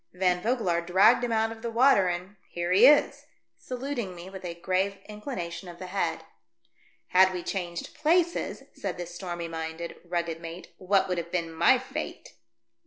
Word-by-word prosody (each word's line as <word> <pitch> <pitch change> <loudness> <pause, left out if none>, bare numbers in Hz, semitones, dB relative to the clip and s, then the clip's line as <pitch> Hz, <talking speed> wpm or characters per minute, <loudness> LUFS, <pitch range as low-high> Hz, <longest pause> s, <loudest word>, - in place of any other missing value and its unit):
Van 180 -1 +1
Vogelaar 210 -7 +1
dragged 190 +8 +5
him 240 - -1
out 225 0 +1
of 225 0 -9
the 235 - -3
water, 230 -4 +5
and 180 +3 -4
— - - -34
here 175 0 -1
he 205 +7 +8
is!" 295 0 +4 0.3
saluting 250 -6 -4
me 175 +2 -10
with 190 -1 -9
a 170 -1 -5
grave 190 +3 0
inclination 210 -5 -6
of 170 - -10
the 185 - -7
head. 170 -4 -2 0.9
"Had 185 +1 +6
we 180 -2 -4
changed 175 -3 -4
places," 340 +3 +1
said - - -4
the 175 - -4
stormy 175 -1 -5
minded, 165 +1 -5
rugged 170 -2 -3
mate, 165 +1 -9
" - - -42
what 195 +1 +2
would 180 -2 -1
have 170 0 -7
been 165 -2 -2
my 160 - +5
fate - - -6
185 Hz, 180 wpm, -28 LUFS, 170-220 Hz, 0.9 s, he